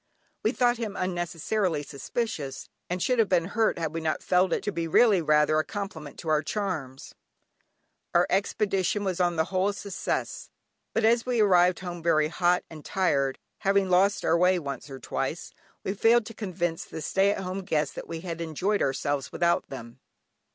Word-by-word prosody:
We 220 - +2
thought 245 -1 +2
him 220 -4 -4
unnecessarily 175 -1 -1
suspicious, 140 - -4 0.2
and 180 0 -1
should 250 -2 +1
have 220 - +3
been 175 -3 +3
hurt 220 +4 +1
had 160 -2 -2
we 165 - -3
not 160 -1 -1
felt 180 +1 +3
it - - 0
to 205 - -1
be 170 -3 -2
really 200 +2 +5
rather 155 0 +3
a - - +2
compliment 170 -8 -6
to 160 - -5
our 155 -1 +3
charms. 155 -9 -4 1.0
Our 175 +1 +5
expedition 195 0 0
was 190 -2 -2
on 175 -1 +2
the 160 - +2
whole 185 +1 +2
a 205 - -3
success, 205 - -3 0.5
but 225 - +2
as 230 +2 +3
we 245 -2 +1
arrived 180 -4 +4
home 175 -2 -6
very 155 -2 +2
hot 175 +1 +2
and 155 -2 -11
tired, 140 -8 +1 0.2
having 195 -1 +2
lost 195 +3 +3
our - - +4
way 180 +2 +4
once 140 -3 -5
or 135 - -7
twice, - - -4 0.3
we 195 - -1
failed 225 +3 +4
to 225 - -8
convince 175 -6 -3
the - - -8
stay 195 +5 +2
at 200 -1 -1
homes 180 -5 -1
that - - -8
we 165 -1 -5
had 170 -2 -5
enjoyed 180 +6 -1
ourselves 140 0 -1
without 170 0 +1
them. 120 -2 -9
180 Hz, 185 wpm, -27 LUFS, 160-200 Hz, 1.0 s, really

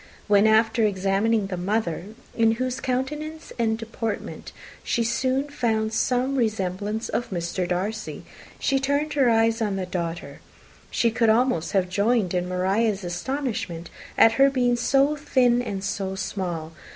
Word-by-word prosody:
When, 205 0 +5
after 225 +1 +3
examining 200 +2 +1
the 190 -2 -4
mother, 180 -2 -1 0.3
in 225 -1 +4
whose 255 +2 -2
countenance 300 +5 -3
and 220 -1 +1
deportment 225 -1 -5 0.3
she 235 - 0
soon 260 +4 0
found 225 -5 -1
some 255 +4 +1
resemblance 210 -1 -1
of 240 - -2
Mr. 175 0 -2
Darcy, 200 +5 -3 0.3
she 270 -1 +1
turned 285 +3 0
her 270 -4 +3
eyes 225 0 +2
on 205 -3 0
the 190 -1 -2
daughter, 170 -2 -5 0.5
she 230 - +1
could 225 0 +2
almost 220 -7 +2
have 190 -2 +2
joined 200 +1 +1
in 180 0 -1
Maria's 195 +3 0
astonishment 175 - -3 0.3
at 225 - +7
her 275 - +7
being 250 -3 +2
so 275 +4 +2
thin 250 -4 +2
and 200 -5 -4
so 195 -1 -2
small. 175 -4 -4
220 Hz, 145 wpm, -24 LUFS, 190-250 Hz, 0.5 s, at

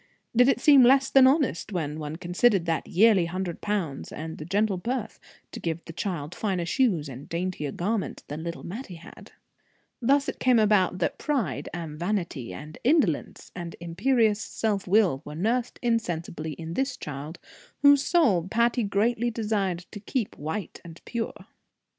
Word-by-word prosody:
Did 245 +3 +6
it - - +2
seem 285 -3 +7
less 265 +2 +5
than 265 -1 +7
honest, 265 - +1
when 155 -5 -3
one 150 0 -5
considered 180 +3 +2
that 165 -1 -1
yearly 200 -2 +4
hundred 180 0 -4
pounds, 190 -10 -3
and 160 +1 -6
the 150 - -6
gentle 200 +2 +1
birth, 235 +4 -4 0.3
to - - -7
give 165 0 -3
the 165 - -9
child 170 -4 -4
finer 190 -5 -2
shoes 180 - +1
and 135 +2 -9
daintier 170 -4 -3
garments 200 +6 -2
than 150 +2 -5
little 170 0 -6
Mattie 195 0 -7
had? 165 - -14 0.7
Thus 275 +4 +3
it - - -4
came 255 -2 +4
about 210 -4 +3
that 175 - -1
pride, 275 - -1
and 160 -3 -6
vanity, 175 - -2
and 150 +1 -9
indolence, 245 - +1
and 175 -2 -6
imperious 210 +5 +1
self 205 -4 -2
will, 185 -8 +3
were 150 - -8
nursed 230 +8 -1
insensibly 170 -9 -2
in 165 +2 -7
this 270 +5 -1
child, 150 +3 -7 0.5
whose 285 -1 +7
soul 220 - +3
Patty 235 +4 +2
greatly 225 +3 +1
desired 205 -6 -1
to 205 - -7
keep 220 +1 -3
white 160 +7 -5
and 170 -1 -11
pure. 235 -2 -4
190 Hz, 165 wpm, -26 LUFS, 165-235 Hz, 0.7 s, seem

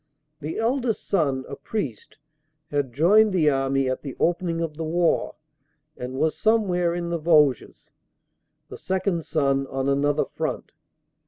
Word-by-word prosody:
The 155 +2 -5
eldest 235 0 -1
son, 140 -9 0
a 140 - -6
priest, 140 - -5 0.5
had 145 -3 -1
joined 195 - +4
the 155 -5 +3
army 135 0 0
at 130 - -2
the 140 -3 -7
opening 170 -1 0
of 165 -2 -3
the 160 - -4
war 170 +1 0 0.6
and 125 +1 -6
was 160 +3 +1
some 220 -1 +2
where 175 -1 0
in 170 -1 -3
the 170 - -1
Vosges; 150 -5 +2 0.8
the - - -9
second 185 -1 -1
son 135 -3 0
on 135 0 -3
another 140 +1 +1
front. - - -4
160 Hz, 150 wpm, -24 LUFS, 140-175 Hz, 0.8 s, joined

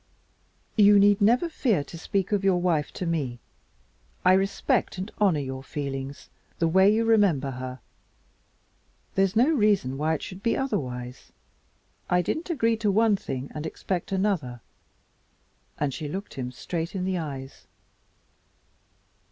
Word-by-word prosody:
"You 205 -1 +7
need 200 0 +5
never 240 +10 +4
fear 230 - 0
to 155 - -11
speak 190 +4 -2
of 205 -2 +1
your 190 -2 +3
wife 165 -5 0
to 180 - -4
me. 145 -8 -2 0.9
I 185 - +7
respect 195 0 +1
and 190 +4 -5
honor 190 -7 +3
your 130 -1 -5
feelings 135 -1 -6 0.3
the 165 - +2
way 190 +4 +5
you 225 +2 +2
remember 195 -12 +3
her. 130 0 -6 1.3
There's 195 +1 +1
no 245 +7 +5
reason 205 - +2
why 160 +2 +1
it - - -6
should 185 +1 -8
be 230 - +1
otherwise. 125 - -4 0.8
I 180 0 +3
did - - -1
not 340 +3 -8
agree 230 -9 +1
to 215 -1 0
one 220 +1 +4
thing 135 -8 -5
and 150 - -5
expect 180 +3 -4
another," 185 - -1 1.2
and 145 -2 -1
she 155 +1 -5
looked 190 +7 -6
him 125 -2 -5
straight 165 +7 -4
in 185 -1 -2
the 185 -1 -1
eyes. 135 -4 -7
180 Hz, 150 wpm, -26 LUFS, 140-205 Hz, 1.3 s, You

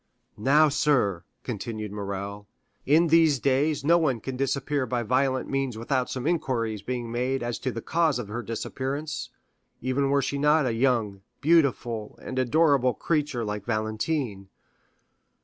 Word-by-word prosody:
"Now, 145 +7 +5
sir," 140 - +1 0.2
continued 110 -2 -5
Morrel, 100 0 -5 0.4
"in 160 +4 +4
these 160 -3 +5
days 140 +3 +1
no 170 +2 +5
one 135 -8 +1
can 130 +4 -5
disappear 135 +1 -1
by 120 -1 -1
violent 130 +3 +1
means 135 -4 -2
without 125 +2 -1
some 130 0 -4
inquiries 125 - -1
being 120 -1 -4
made 125 +2 -1
as 120 0 -3
to 130 - -2
the 115 -1 -6
cause 165 -4 +1
of 120 -4 -5
her 110 +4 -4
disappearance, 135 +6 -4 0.5
even 130 +2 0
were 140 0 +2
she 140 +2 -2
not 150 +1 +4
a 120 - 0
young, 115 -5 +1 0.2
beautiful, 130 -9 +1
and 130 - -4
adorable 130 -1 +3
creature 145 -7 -1
like 105 -1 -4
Valentine. 110 -1 -2
130 Hz, 150 wpm, -26 LUFS, 115-145 Hz, 0.5 s, Now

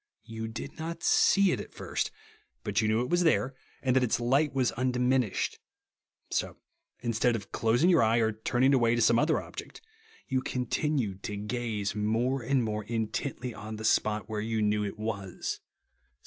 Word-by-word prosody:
You 110 -1 -5
did 115 +7 -7
not 165 +1 -5
see 200 -2 +5
it - - -1
at - - -9
first, - - -2 0.5
but - - +1
you 110 - +1
knew 110 +2 +2
it 125 - -2
was 175 0 +3
there, 155 -6 +2 0.3
and 130 -2 +2
that 130 - +5
its 125 -2 +1
light 135 +5 +2
was 130 -4 +1
undi 125 +1 0
minished. 125 -4 +1 0.7
So, - - -1 0.4
instead 120 0 +1
of 100 -3 -6
closing 120 +9 +2
your 180 -3 +5
eye 115 +1 +3
or 110 -1 +3
turning 120 +5 +2
away 120 -3 +4
to 120 - +1
some 115 +1 +5
other 155 +3 +2
object, - - -9 0.5
you 130 -2 0
continued 125 -5 -1
to 105 - -4
gaze 105 -1 -2
more 115 +5 0
and 130 +1 +1
more 105 -1 -2
intently 120 +3 -3
on 110 +1 -7
the 110 +1 -6
spot 105 -1 +2
w^here 105 -1 -3
you 110 -1 0
knew 105 0 +2
it 100 - -4
was. 100 -4 -4
115 Hz, 180 wpm, -29 LUFS, 110-130 Hz, 0.7 s, see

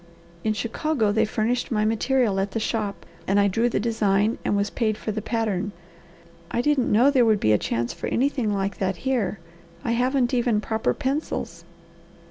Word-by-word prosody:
In 215 - +1
Chicago 230 +1 0
they 215 - +2
furnished 230 +3 -1
my 215 -3 +1
material 225 -1 +1
at 195 +1 0
the 225 - 0
shop 215 -2 -3 0.2
and 195 +1 +3
I 200 - +4
drew 225 +5 +1
the - - 0
design 215 -1 +1
and 205 - +1
was 200 +1 0
paid 215 -3 0
for 215 - -4
the 215 +1 -3
pattern. 210 -3 -1 0.8
I - - -1
didn't 295 -4 +2
know 245 +7 +5
there 260 -3 +4
would 220 -3 +3
be 110 - +2
a 105 - +4
chance 115 +4 -2
for - - -5
anything 255 -4 0
like 195 -1 -2
that 190 -1 0
here. 235 -7 0 0.5
I 230 - 0
haven't 250 +1 +1
even 240 -3 +2
proper 220 +1 -1
pencils." 290 +2 -3
220 Hz, 185 wpm, -24 LUFS, 205-245 Hz, 0.8 s, know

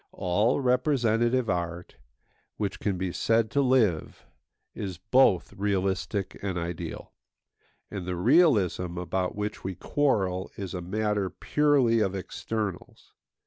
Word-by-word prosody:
All 105 +9 +1
representative 125 -2 +2
art, 85 -1 -3 0.6
which 105 -2 -3
can 100 -3 -1
be 95 0 -2
said 115 +3 +1
to 140 - +2
live, 120 - +1 0.5
is 95 -4 -5
both 105 0 +3
realistic 95 0 -1
and 95 -3 -2
ideal; 85 -1 -5 0.8
and 95 -4 -5
the 90 - -2
realism 100 - +3
about 90 +1 -2
which 105 +1 -4
we 95 0 -4
quarrel 95 - 0
is 100 -2 -5
a 90 - -4
matter 105 +1 -1
purely 140 -5 +2
of 100 -3 0
externals. 105 +1 -5
100 Hz, 120 wpm, -27 LUFS, 90-115 Hz, 0.8 s, both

